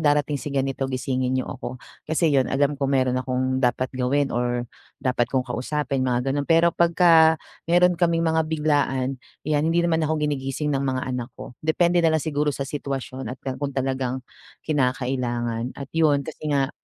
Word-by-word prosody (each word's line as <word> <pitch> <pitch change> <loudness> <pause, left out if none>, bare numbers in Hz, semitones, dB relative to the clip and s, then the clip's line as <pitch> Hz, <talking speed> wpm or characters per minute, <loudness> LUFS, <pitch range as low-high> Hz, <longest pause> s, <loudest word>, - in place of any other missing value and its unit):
darating 145 -2 +2
si - - -5
ganito 135 -1 -1
gisingin 130 0 -1
niyo 130 - 0
ako," 130 -2 -6 0.3
kasi 160 -1 +2
'yon 135 -2 +3
alam 140 +2 +2
ko 140 -1 -2
meron 130 -2 +2
akong 130 0 -1
dapat 130 0 0
gawin 135 +2 0
or 120 0 0 0.3
dapat 125 -2 0
kong 130 -1 0
kausapin 135 +2 -2
mga 125 +2 0
gano'n. 145 +1 -2
Pero 170 +1 +5
pagka 170 -2 +5 0.3
meron 175 0 +4
kaming 170 -1 +2
mga 160 -1 +1
biglaan 140 -4 0 0.2
'yan 150 +1 +1
hindi 170 +1 +2
naman 165 -1 +2
ako 155 -1 0
ginigising 145 +1 -2
ng 135 - 0
mga 130 -2 -1
anak 125 -2 -3
ko, - - -9
depende 170 +3 +2
na 160 -1 +3
lang 155 - -2
siguro 150 -1 0
sa 140 -1 -2
sitwasyon 135 -3 -5
at 125 - -5
ka 130 - -2
kung 140 -1 -1
talagang 130 -1 -1 0.5
kinakailangan. 125 -4 -1
At 140 - -5
'yon 150 -3 +3
kasi 155 -1 -5
nga, 140 -1 +1
140 Hz, 180 wpm, -24 LUFS, 130-155 Hz, 0.5 s, Pero